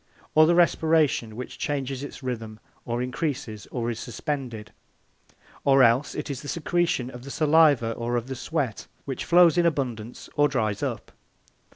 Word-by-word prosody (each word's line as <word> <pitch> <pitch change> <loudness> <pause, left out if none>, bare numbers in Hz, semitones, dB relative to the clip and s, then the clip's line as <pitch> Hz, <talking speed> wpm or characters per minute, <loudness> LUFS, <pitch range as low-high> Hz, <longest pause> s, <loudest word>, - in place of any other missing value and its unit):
Or 155 0 +6
the 170 - +4
respiration, 160 -9 +2
which 125 +2 -7
changes 135 -2 -2
its 145 - -9
rhythm, 110 -4 -5 0.3
or 120 +1 -2
increases, 125 -5 -4
or 120 -1 -2
is 115 - -6
suspended. 120 -5 -5 0.9
Or 135 -1 +5
else 125 +4 +3
it 150 - -4
is 135 - -5
the 145 - -9
secretion 165 -5 0
of 125 -1 -10
the 140 - -9
saliva 150 -6 +4
or 120 +1 -3
of 120 -1 -1
the 135 - -5
sweat, 130 -2 -3 0.2
which 135 -2 -4
flows 175 0 +5
in 175 - +3
abundance 125 -7 -3
or 145 0 +4
dries 110 -7 -1
up. - - -4
130 Hz, 165 wpm, -25 LUFS, 120-150 Hz, 0.9 s, Or